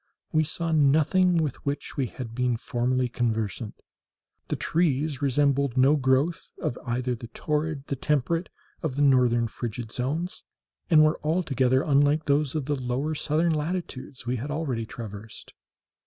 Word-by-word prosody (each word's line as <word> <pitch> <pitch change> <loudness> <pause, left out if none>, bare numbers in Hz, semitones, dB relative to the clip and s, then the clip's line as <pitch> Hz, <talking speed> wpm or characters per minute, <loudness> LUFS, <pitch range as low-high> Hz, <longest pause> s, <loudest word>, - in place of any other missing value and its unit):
We 155 - +3
saw 165 +2 -2
nothing 160 +5 +4
with 155 -5 -1
which 140 0 -3
we 135 -3 0
had 115 0 -7
been 125 -1 0
formerly 125 +2 0
conversant. 115 -2 -2 0.7
The - - -1
trees 150 -3 0
resembled 140 -1 +2
no 135 +4 +5
growth 135 +4 +1
of - - -2
either 125 +1 -1
the 120 0 -7
torrid, 150 +3 -2
the 140 - -2
temperate, 150 +5 0 0.3
or 160 - 0
the 140 +2 0
northern 125 -4 +4
frigid 115 0 -5
zones, 150 +10 -3 0.5
and 155 -3 +7
were 155 - +1
altogether 135 -5 +2
unlike 145 +1 +3
those 145 -1 +1
of 150 -4 -1
the 145 +1 0
lower 130 +4 -2
southern 155 +2 +1
latitudes 150 -5 -4
we 125 +1 -1
had 135 +6 -5
already 135 -7 -2
traversed. 105 -1 -9
140 Hz, 150 wpm, -26 LUFS, 125-155 Hz, 0.7 s, and